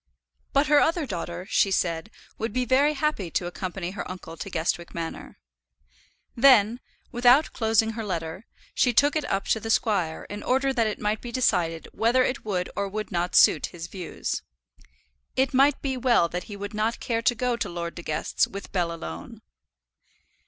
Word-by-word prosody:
But 280 +2 +3
her 295 -1 +5
other 330 0 +2
daughter, 175 -4 -5
she 200 - +3
said, 170 0 -1 0.3
would 225 0 -2
be 255 +3 0
very 275 +5 +3
happy 295 - -1
to 175 - -1
accompany 180 0 -4
her 200 - -6
uncle 180 -3 -8
to 195 - -7
Guestwick 170 0 -2
Manor. 165 -1 -6 1.0
Then, 235 -3 +5 0.3
without 245 +4 +4
closing 225 -1 +2
her 225 0 -5
letter, 170 0 -4 0.3
she 245 - +2
took 290 +6 +4
it 305 -2 0
up 195 0 -1
to 220 - +2
the 225 - -6
squire 195 -8 +1
in 205 0 -6
order 270 +1 +1
that 230 -3 +2
it 215 - -3
might 210 +1 -1
be 240 - -7
decided 165 -10 0
whether 240 +3 +3
it 255 - -2
would 185 -4 -2
or 200 0 -2
would 215 +2 -5
not 175 0 -1
suit - - +6
his 170 -2 -8
views. 180 0 -4 0.9
It 265 +1 +1
might 275 +2 +5
well 255 -8 +2
be - - -23
that 180 +1 -3
he 205 - -8
would 205 +2 -6
not 215 +2 -1
care 230 -1 -1
to 240 +1 +2
go 245 +1 0
to 235 - -3
Lord 170 -1 -4
De 170 - -8
Guest's 155 -2 0
with 200 +1 -8
Bell 175 -3 0
alone. 85 - -8
210 Hz, 185 wpm, -26 LUFS, 175-250 Hz, 1.0 s, suit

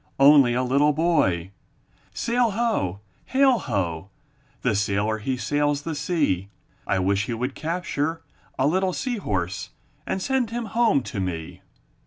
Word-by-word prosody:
Only 135 -3 +7
a 125 - +1
little 140 +4 +3
boy! 100 - +1 0.6
Sail! 240 0 +1
Ho! 200 - -1 0.2
Hail! 265 -2 +3
Ho! 95 - -2 0.5
The - - +2
sailor 105 +1 0
he 130 +4 -2
sails 145 +4 0
the 165 - -3
sea; 145 - 0 0.4
I - - +1
wish 100 +2 +1
he 120 - -3
would 125 +4 -3
capture 165 -1 -2 0.3
A 130 - +2
little 185 +5 +1
sea 250 +2 -2
horse 95 - -3 0.4
And - - -1
send 260 +2 0
him 235 0 -3
home 225 - +3
to 105 -2 -5
me. 85 -4 -4
140 Hz, 145 wpm, -24 LUFS, -, 0.6 s, Only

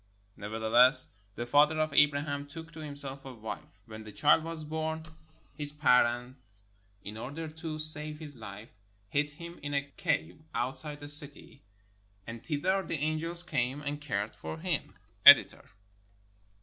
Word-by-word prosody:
Nevertheless, 110 - +3 0.2
the 120 - -4
father 150 +5 +3
of 155 -2 0
Abraham 145 0 +2
took 160 +3 -10
to 160 - -11
himself 140 -2 0
a 135 - -8
wife. 110 -1 -9
When 110 0 -10
the 110 - -10
child 150 +7 +3
was 165 -1 -6
born, 160 +1 -4 0.5
his 145 -1 -1
parents 125 -6 +1 0.4
in 105 +1 -8
order 145 +8 -6
to 160 0 -7
save 155 0 -5
his 150 -3 -10
life 110 -1 -10 0.4
hid 150 +4 0
him 170 +3 -11
in 145 0 -4
a 140 - +1
cave 150 - -2
outside 135 +5 -4
the 145 - -8
city, 145 -1 +4 0.6
and 115 0 -9
thither 180 +6 0
the 165 - -3
angels 155 +3 -3
came 135 -3 -2
and 145 0 -4
cared 105 -7 -3
for 80 0 -7
him. - - -3 0.3
The - - +13
Editor. - - +6
145 Hz, 150 wpm, -30 LUFS, 120-155 Hz, 0.6 s, The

